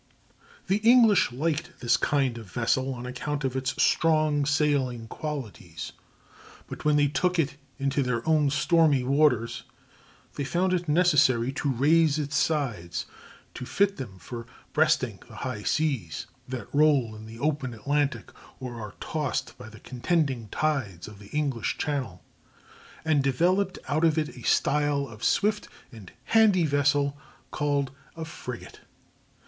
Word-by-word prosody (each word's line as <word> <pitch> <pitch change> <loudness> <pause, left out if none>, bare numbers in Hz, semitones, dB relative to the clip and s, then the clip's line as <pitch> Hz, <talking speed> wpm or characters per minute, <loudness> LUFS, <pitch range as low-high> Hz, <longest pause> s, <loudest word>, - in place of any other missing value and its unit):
The 195 +2 +2
English 225 - +5
liked 150 +5 -2
this 120 0 +3
kind 135 -5 0
of 105 -5 -12
vessel 130 +5 0
on 120 0 -7
account 145 +3 -4
of 130 -1 -1
its 130 0 -2
strong 155 -3 +3
sailing 140 -6 +1
qualities, 110 - -6 0.7
but - - -8
when 150 0 +3
they 145 -1 +4
took 180 +6 0
it 145 -3 0 0.2
into 140 +1 0
their 125 -1 -2
own 155 -3 +3
stormy 150 -2 +3
waters 125 -4 +2 0.8
they 140 - -1
found 180 +6 0
it 175 -3 -1
necessary 150 -7 +4
to 140 +1 -2
raise 150 +4 +3
its 150 0 -3
sides 120 - -1 0.5
to - - -7
fit 195 +10 +1
them 110 -8 -7
for 115 +7 -8 0.3
breasting 150 -9 +2
the - - -13
high 125 -5 -4
seas 130 - -1 0.2
that 125 -5 -7
roll 140 -7 +3
in 110 +1 -10
the 115 +1 -10
open 140 -1 -1
Atlantic 145 +5 -1 0.3
or 120 -3 -6
are 105 -2 -8
tossed 150 -4 -3
by 120 -3 -9
the 110 -1 -13
contending 130 -2 -1
tides 125 - -2
of 105 -2 -12
the 100 - -13
English 140 -7 -1
Channel, 130 -11 -3 0.8
and 150 -3 +3
developed 180 +8 +1
out 155 +3 0
of 160 -1 +3
it 155 -1 -1
a 125 - -11
style 145 +3 +1
of 110 0 -12
swift 210 - +1 0.2
and 110 -7 -12
handy 210 -6 +4
vessel 145 -1 +2 0.4
called 145 -2 0 0.2
a 165 -1 -5
frigate. 125 -6 -8
140 Hz, 145 wpm, -27 LUFS, 120-155 Hz, 0.8 s, English